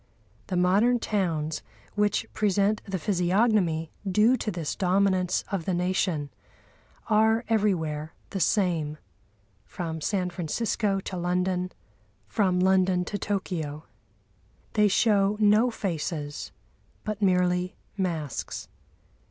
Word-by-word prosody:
The 185 - -1
modern 200 +7 +4
towns, 165 -9 -1 0.3
which 205 -1 +1
present 205 0 +2
the 195 -2 -2
physiognomy 180 -2 +1 0.2
due 215 +6 +4
to 225 - -3
this 170 -6 -3
dominance 185 -1 +2
of 190 -5 -2
the 185 - 0
Nation, 175 -5 0 0.8
are 220 +2 +3
everywhere 165 -8 0 0.2
the 195 - -2
same, 165 -5 +1 0.7
from 160 -3 -5
San 185 0 -1
Francisco 195 +4 -1
to 190 - -5
London, 180 +1 0 0.6
from 185 -5 +1
London 185 -1 +3
to 205 - -4
Tokyo. 160 -7 -3 0.9
They 210 -1 +4
show 205 0 +3
no 215 +3 +5
faces, 160 -8 -4 0.5
but 215 -1 -4
merely 180 -1 +2 0.2
masks. 165 - -3
185 Hz, 105 wpm, -27 LUFS, 175-205 Hz, 0.9 s, no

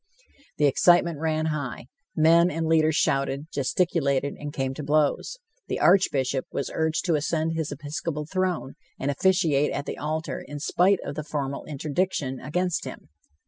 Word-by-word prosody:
The 150 - +3
excitement 170 +2 +4
ran 155 0 0
high; 135 -5 -5 0.3
men 165 +2 +5
and 165 -1 -2
leaders 160 -1 +3
shouted, 140 -1 0
gesticulated 140 -2 0
and 145 0 -7
came 135 -2 -2
to 150 - -6
blows. 150 - +1 0.3
The - - -2
Archbishop 140 -8 +3
was 140 - -3
urged 160 +1 0
to 175 - +2
ascend 160 +1 0
his 160 -2 -2
episcopal 150 +1 -4
throne 185 -4 -2 0.3
and 140 +2 0
officiate 155 -3 +2
at 145 - -3
the - - -5
altar 155 -2 -3
in 145 +1 -8
spite 180 +5 +2
of - - -4
the 155 - -4
formal 140 -2 -4
interdiction 150 -2 -2
against 180 +5 -1
him. - - -9
155 Hz, 155 wpm, -25 LUFS, 140-165 Hz, 0.3 s, men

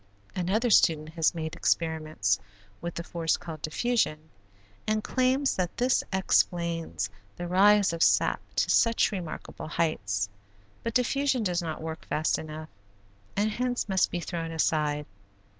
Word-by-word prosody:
Another 210 +7 +1
student 155 -5 +4
has 165 +1 +1
made 160 -1 -4
experiments 155 -12 0 0.4
with 170 0 -5
the 170 - -4
force 165 -2 0
called 160 -3 -8
diffusion, 155 -3 -1 0.6
and 215 0 +1
claims 260 +2 +1
that 180 -2 -2
this 250 +1 +2
explains 170 - 0 0.2
the 175 - -5
rise 200 +1 +5
of 165 - -4
sap - - +3
to - - +2
such 230 -2 +4
remarkable 180 -6 -6
heights; 100 -12 -1 0.5
but 230 - -4
diffusion 260 0 +2
does 180 -3 0
not 160 -2 -5
work 160 0 -5
fast 155 0 0
enough 155 0 -7 0.7
and 210 +2 +2
hence 245 +1 -1
must 190 -2 +2
be 175 - -3
thrown 165 -1 -4
aside. 150 -2 0
170 Hz, 140 wpm, -28 LUFS, 155-210 Hz, 0.7 s, rise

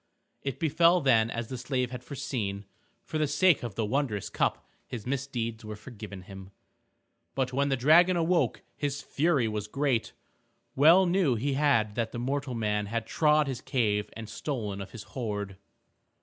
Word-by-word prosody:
It 135 -3 -4
befell 165 +3 +4
then 120 -7 +3
as 115 -1 -4
the 130 -2 -5
slave 125 -1 -1
had 125 -1 -7
foreseen. 115 -8 -4 0.4
For 155 - -3
the 155 - +2
sake 160 +4 +4
of 115 -5 -6
the 110 - 0
wondrous 110 -3 -1
cup - - 0 0.2
his 115 -4 -6
misdeeds 125 -4 -3
were 110 0 -6
forgiven 105 -4 -9
him. 95 0 -10 0.9
But 130 -2 -1
when 140 +2 +1
the 135 - +1
dragon 170 +8 +5
awoke 170 +1 +1
his 145 0 -3
fury 145 -5 +1
was 105 -1 -3
great. 135 -1 0 0.6
Well 165 +7 +7
knew 175 -7 +2
he 135 +5 -1
that 115 -6 +1
mortal 130 +2 -2
man 105 -2 -1
had 115 +1 -2
trod 150 +4 +3
his 130 -3 -4
cave 105 -5 0
and 115 -1 -7
stolen 110 -4 -4
of 100 - -7
his 110 0 -9
hoard. 105 -6 -4
125 Hz, 165 wpm, -28 LUFS, 110-145 Hz, 0.9 s, Well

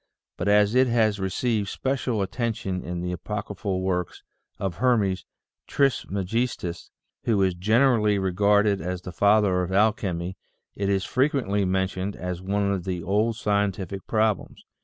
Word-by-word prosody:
But - - -3
as 105 +1 +4
it 130 +1 +4
has 110 -3 +2
received 100 +2 -1
special 125 -5 -1
attention 110 -4 -2
in 85 0 -5
the 90 0 -3
apocryphal 100 +1 -4
works 90 -2 -2 0.3
of 95 -4 -3
Hermes 105 -6 +1 0.4
Tris 135 -3 +1
megistus, 100 -2 -2 0.4
who 105 -4 +3
is 95 -1 +2
generally 110 +2 +3
regarded 100 +2 +2
as 90 +2 -4
the 90 - -6
Father 100 -1 +3
of 90 0 -3
Al 105 +3 +4
chemy, 90 -3 -4 0.4
it 100 -1 -1
is 95 -1 +1
frequently 130 -7 +1
mentioned 95 +1 -1
as 90 -1 -5
one 100 +1 0
of 95 -3 -2
the 90 -2 -3
old 105 +5 +1
scientific 100 -3 -1
problems. 110 -2 0
100 Hz, 145 wpm, -25 LUFS, 95-110 Hz, 0.4 s, as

